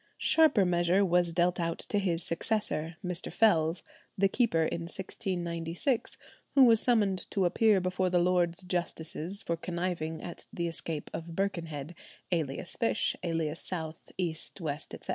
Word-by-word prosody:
Sharper 310 Hz, -12 st, +4 dB
measure 180 Hz, +2 st, +3 dB
was 175 Hz, -1 st, +2 dB
dealt 175 Hz, +1 st, +1 dB
out 170 Hz, -1 st, -1 dB
to 205 Hz, -, 0 dB
his 175 Hz, -4 st, 0 dB
successor, 165 Hz, -3 st, 0 dB
Mr. 180 Hz, 0 st, -2 dB
Fells, 170 Hz, -6 st, +3 dB, 0.3 s
the 195 Hz, +1 st, +4 dB
keeper 195 Hz, -6 st, +2 dB
in 165 Hz, -, -2 dB
1696, 175 Hz, -, -2 dB, 0.4 s
who 275 Hz, -, +8 dB
was 230 Hz, -3 st, +6 dB
summoned 205 Hz, -6 st, +2 dB
to 195 Hz, -2 st, +1 dB
appear 210 Hz, +3 st, +4 dB
before 185 Hz, 0 st, 0 dB
the 180 Hz, -, +2 dB
Lords 175 Hz, 0 st, +2 dB
Justices 175 Hz, +1 st, -3 dB
for 170 Hz, -, -1 dB
conniving 170 Hz, -2 st, -3 dB
at 175 Hz, -, -8 dB
the 170 Hz, -1 st, -2 dB
escape 165 Hz, -2 st, -3 dB
of 165 Hz, 0 st, -6 dB
Birkenhead, 165 Hz, -6 st, -3 dB, 0.4 s
alias 160 Hz, -1 st, -1 dB
Fish, 230 Hz, -1 st, +1 dB
alias 165 Hz, -2 st, -2 dB
South, 160 Hz, -3 st, -4 dB
East, 170 Hz, 0 st, -3 dB
West, 150 Hz, -3 st, -4 dB
etc. -, -, -13 dB
175 Hz, 145 wpm, -30 LUFS, 165-190 Hz, 0.4 s, who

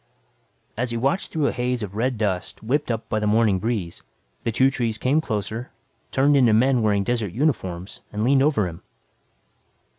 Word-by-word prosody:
As 125 Hz, +2 st, -1 dB
he 115 Hz, -, -2 dB
watched 135 Hz, +10 st, 0 dB
through 155 Hz, -3 st, 0 dB
a -, -, +2 dB
haze 125 Hz, -1 st, -2 dB
of 100 Hz, -2 st, -6 dB
red 125 Hz, +2 st, 0 dB
dust 100 Hz, -3 st, -2 dB
whipped 140 Hz, +6 st, 0 dB
up 115 Hz, -1 st, -2 dB
by 110 Hz, -, -1 dB
the 105 Hz, -, -1 dB
morning 105 Hz, -3 st, +3 dB
breeze, 100 Hz, -5 st, -3 dB, 0.4 s
the 115 Hz, -, 0 dB
two 130 Hz, +4 st, +3 dB
trees 115 Hz, -4 st, -1 dB
came 140 Hz, +5 st, +2 dB
closer, 110 Hz, -1 st, -4 dB, 0.4 s
turned 140 Hz, +2 st, +3 dB
into 125 Hz, -5 st, +5 dB
men 125 Hz, +3 st, +3 dB
wearing 105 Hz, -2 st, +2 dB
desert 115 Hz, -5 st, -1 dB
uniforms 95 Hz, -, -2 dB
and 105 Hz, 0 st, -2 dB
leaned 135 Hz, +3 st, +4 dB
over 135 Hz, -9 st, +2 dB
him. 85 Hz, -1 st, -9 dB
115 Hz, 180 wpm, -23 LUFS, 105-130 Hz, 0.4 s, into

